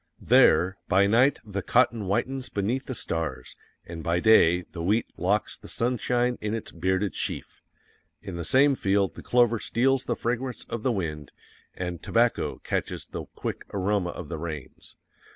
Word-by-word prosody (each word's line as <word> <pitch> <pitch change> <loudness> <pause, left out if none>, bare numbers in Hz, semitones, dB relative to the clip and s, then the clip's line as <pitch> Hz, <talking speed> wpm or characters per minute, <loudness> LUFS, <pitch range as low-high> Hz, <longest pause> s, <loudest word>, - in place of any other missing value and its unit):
There, 95 +2 +4
by 100 0 +4
night 120 +7 +4
the 100 -2 -4
cotton 120 -1 +2
whitens 130 +7 -1
beneath 115 +7 -2
the 130 - -4
stars, 80 - -4 0.3
and 85 -1 -8
by 85 +2 +1
day 90 -4 +5
THE 85 - -9
WHEAT 105 +7 +1
LOCKS 100 +4 0
THE - - -12
SUNSHINE 125 +1 0
IN 105 +1 -2
ITS 115 - -6
BEARDED 95 +3 -1
SHEAF. - - -4 0.6
In - - -8
the 85 - -4
same 135 - +4
field 100 -5 +1
the - - -10
clover 120 -2 +3
steals 130 +4 +1
the - - -1
fragrance 125 +1 -3
of 115 -1 -4
the 130 - +1
wind, 75 -8 -4 0.4
and 90 -2 -4
tobacco 115 +1 +1
catches - - -3
the - - -7
quick - - -5
aroma 100 -1 0
of 85 -2 -7
the 80 0 -5
rains. 75 -5 -7
100 Hz, 165 wpm, -26 LUFS, 90-120 Hz, 0.6 s, day